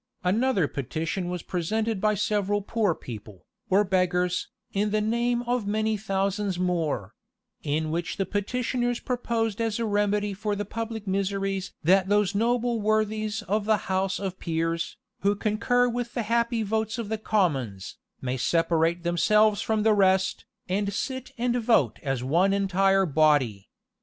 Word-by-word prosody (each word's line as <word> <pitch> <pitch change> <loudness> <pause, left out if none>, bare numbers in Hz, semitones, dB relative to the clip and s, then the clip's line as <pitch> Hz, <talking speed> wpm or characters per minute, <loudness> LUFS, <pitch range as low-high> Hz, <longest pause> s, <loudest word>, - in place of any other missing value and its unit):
'"[] - - -40
Another 200 - +2
petition 160 +7 -3
was 180 -2 -4
presented 215 +4 -1
by 215 0 +3
several 205 0 0
poor 205 -5 +1
people, 105 -5 -10 0.2
or 195 +2 +4
beggars, 180 -1 +1 0.3
in 205 +1 +1
the 215 +1 +1
name 235 +3 0
of 245 -3 -1
many 215 +1 +1
thousands 195 -1 -1
more; 165 - -1 0.5
in 155 +1 -1
which 170 +1 -2
the 195 - 0
petitioners 240 +5 -1
proposed 230 -4 -1
as 225 -2 0
a 230 - -1
remedy 205 -1 +1
for 210 +1 -2
the 205 +1 -3
public 225 -1 -5
miseries 195 0 -1
"That 190 +3 +4
those 205 -1 +2
noble 235 +2 +1
worthies 215 0 0
of 205 +3 -1
the 215 0 +3
house 190 +1 +1
of 190 -2 -4
peers, 165 +1 -2 0.2
who 200 +1 +2
concur 230 +4 +1
with 240 0 -3
the 240 - 0
happy 235 +1 +1
votes 220 +1 -1
of 230 -3 -4
the 220 +1 -2
commons, 135 - -1 0.2
may 130 0 -2
separate 165 +3 +1
themselves 210 +4 +3
from 220 -1 0
the 220 0 +5
rest, 190 -1 +2 0.2
and 200 +2 0
sit 260 +5 -4
and 240 +1 0
vote 225 - +2
as 135 -4 -2
one 175 +9 +3
entire 195 0 +3
body." 145 - +2
200 Hz, 155 wpm, -26 LUFS, 180-220 Hz, 0.5 s, the